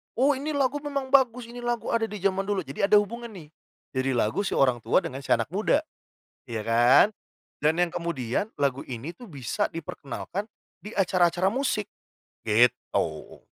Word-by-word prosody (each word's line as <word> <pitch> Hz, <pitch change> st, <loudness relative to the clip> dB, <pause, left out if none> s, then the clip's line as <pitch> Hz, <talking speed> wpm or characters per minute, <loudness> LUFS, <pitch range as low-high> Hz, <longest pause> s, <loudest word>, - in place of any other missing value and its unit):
"Oh 275 Hz, +3 st, +3 dB
ini 290 Hz, +4 st, -3 dB
lagu 285 Hz, 0 st, +1 dB
memang 280 Hz, -2 st, -3 dB
bagus, 250 Hz, -3 st, +3 dB
ini 240 Hz, 0 st, -9 dB
lagu 240 Hz, -1 st, -2 dB
ada 230 Hz, -1 st, +1 dB
di 210 Hz, -1 st, -7 dB
zaman 195 Hz, +1 st, +1 dB
dulu!" 200 Hz, -1 st, -1 dB
jadi 140 Hz, +7 st, -5 dB
ada 210 Hz, 0 st, +7 dB
hubungan 235 Hz, +3 st, -5 dB
nih, 170 Hz, -7 st, -11 dB, 0.5 s
jadi 130 Hz, +1 st, +1 dB
lagu 115 Hz, -, +1 dB
si -, -, -2 dB
orang 130 Hz, -3 st, +3 dB
tua 115 Hz, -, +4 dB
dengan 140 Hz, -6 st, -6 dB
si -, -, -5 dB
anak -, -, +3 dB
muda, 215 Hz, +9 st, +2 dB, 0.7 s
iya 115 Hz, -2 st, -3 dB
kan? 120 Hz, -, +6 dB, 0.5 s
Dan 155 Hz, +4 st, +2 dB
yang 175 Hz, -, +3 dB
kemudian 170 Hz, -, -2 dB
lagu 135 Hz, -1 st, 0 dB
ini 135 Hz, +7 st, -7 dB
tuh 245 Hz, -, -12 dB
bisa 130 Hz, -5 st, -2 dB
diperkenalkan 165 Hz, -, -5 dB, 0.4 s
di 210 Hz, -, -7 dB
acara-acara 185 Hz, -1 st, +2 dB
musik, 225 Hz, -3 st, -1 dB, 0.6 s
gitu. 110 Hz, -8 st, +1 dB
185 Hz, 170 wpm, -26 LUFS, -, 0.7 s, ada